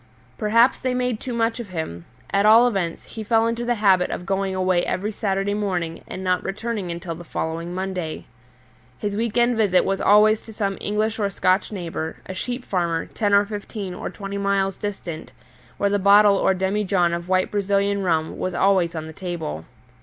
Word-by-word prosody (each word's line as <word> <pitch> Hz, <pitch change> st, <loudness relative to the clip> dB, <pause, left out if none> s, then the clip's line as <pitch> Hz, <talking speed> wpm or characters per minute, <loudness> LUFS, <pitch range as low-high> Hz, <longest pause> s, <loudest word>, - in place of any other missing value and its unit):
Perhaps 230 Hz, -, +3 dB
they 255 Hz, -1 st, -1 dB
made 250 Hz, -3 st, -1 dB
too 255 Hz, -, -5 dB
much 230 Hz, 0 st, 0 dB
of 230 Hz, -4 st, -6 dB
him: 125 Hz, -, -5 dB, 0.3 s
at 200 Hz, 0 st, +3 dB
all 225 Hz, +3 st, +7 dB
events 185 Hz, -8 st, -2 dB
he 220 Hz, -, -8 dB
fell 225 Hz, +1 st, +3 dB
into 230 Hz, +1 st, -1 dB
the 240 Hz, 0 st, +1 dB
habit 195 Hz, -4 st, +3 dB
of 180 Hz, -, -5 dB
going 195 Hz, 0 st, -1 dB
away 185 Hz, -1 st, +2 dB
every 205 Hz, +4 st, -2 dB
Saturday 200 Hz, -1 st, -1 dB
morning 180 Hz, -5 st, -2 dB
and 190 Hz, -, -6 dB
not 180 Hz, -1 st, +1 dB
returning 210 Hz, -2 st, -3 dB
until 170 Hz, 0 st, -5 dB
the 170 Hz, +2 st, -9 dB
following 165 Hz, +1 st, -4 dB
Monday. 185 Hz, -4 st, -4 dB, 0.7 s
His 205 Hz, +5 st, -3 dB
week 230 Hz, +1 st, -1 dB
end 240 Hz, 0 st, +3 dB
visit 200 Hz, -5 st, +3 dB
was 195 Hz, 0 st, -1 dB
always 215 Hz, +1 st, +5 dB
to 220 Hz, -, -9 dB
some 200 Hz, -2 st, -2 dB
English 215 Hz, +2 st, -1 dB
or 200 Hz, -2 st, +1 dB
Scotch 185 Hz, +1 st, +1 dB
neighbour, 165 Hz, -4 st, -4 dB
a 190 Hz, -, -6 dB
sheep 245 Hz, +6 st, -4 dB
farmer, 170 Hz, -3 st, -1 dB
ten 205 Hz, -2 st, 0 dB
or 200 Hz, 0 st, +5 dB
fifteen 205 Hz, -2 st, -6 dB
or -, -, -5 dB
twenty 200 Hz, -1 st, -6 dB
miles 195 Hz, -1 st, +1 dB
distant, 190 Hz, -6 st, -6 dB, 0.4 s
where 200 Hz, -, +1 dB
the 205 Hz, -, +2 dB
bottle 200 Hz, +1 st, +6 dB
or 190 Hz, 0 st, +2 dB
demi 190 Hz, +3 st, 0 dB
john 180 Hz, -3 st, +2 dB
of 170 Hz, +1 st, -4 dB
white 185 Hz, 0 st, +2 dB
Brazilian 200 Hz, 0 st, +1 dB
rum 160 Hz, -4 st, 0 dB
was 185 Hz, -1 st, -2 dB
always 185 Hz, -3 st, +2 dB
on 160 Hz, -1 st, -4 dB
the 160 Hz, -, -9 dB
table. 160 Hz, -, -5 dB
195 Hz, 195 wpm, -23 LUFS, 180-210 Hz, 0.7 s, all